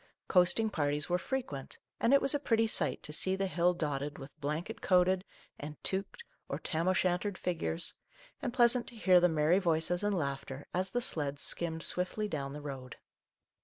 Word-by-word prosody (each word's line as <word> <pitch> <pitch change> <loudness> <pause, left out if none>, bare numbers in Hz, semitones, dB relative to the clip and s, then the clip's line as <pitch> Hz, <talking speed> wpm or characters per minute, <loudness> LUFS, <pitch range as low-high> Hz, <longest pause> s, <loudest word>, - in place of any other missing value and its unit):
Coasting 200 +4 +4
parties 145 -2 0
were 180 0 +1
frequent, 185 - -5 0.2
and 230 - +2
it 280 - +5
was 275 - +4
a 290 - +1
pretty 225 -5 +2
sight 220 - 0
to 150 - -5
see 190 +4 +3
the 195 0 -1
hill 180 -1 +1
dotted 145 -3 -3
with 135 0 -11
blanket 155 +9 -4
coated 185 0 +3 0.4
and 150 +1 -7
toqued 195 - +2 0.3
or - - -2
tam 165 +1 -2
o' - - +5
shantered 185 +2 0
figures, 170 -1 -2 0.5
and 250 - -2
pleasant 240 -1 +3
to 240 - -10
hear 185 -5 +5
the 180 0 +4
merry 160 +3 +3
voices 170 -1 +1
and 205 -2 0
laughter 140 -2 -4
as 185 +1 0
the 245 - -1
sleds 145 - -1
skimmed 165 -1 -1
swiftly 185 +4 -1
down 140 -7 -4
the 150 - -7
road. 135 -3 -7
180 Hz, 185 wpm, -32 LUFS, 150-200 Hz, 0.5 s, it